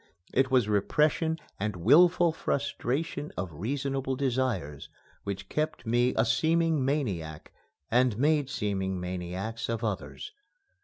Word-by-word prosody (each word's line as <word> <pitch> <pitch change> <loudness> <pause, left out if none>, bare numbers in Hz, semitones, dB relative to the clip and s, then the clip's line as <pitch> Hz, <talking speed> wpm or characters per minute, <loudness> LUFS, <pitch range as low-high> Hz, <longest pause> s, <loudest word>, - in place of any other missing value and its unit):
It 130 0 +3
was 125 -5 +3
repression 150 - +2 0.2
and 105 0 -2
wilful 170 - +5
frustration 145 0 -2
of 90 -3 -4
reasonable 135 - -2
desires 125 - -1 0.4
which 100 0 -4
kept 155 -4 -2
me 120 +2 +2
a 110 - +4
seeming 160 +5 +2
maniac 95 - -2 0.4
and 125 -2 +3
made 145 +1 +2
seeming 95 -5 -2
maniacs 90 +5 -4
of 115 0 -2
others. 110 - -4
125 Hz, 115 wpm, -28 LUFS, 100-145 Hz, 0.4 s, wilful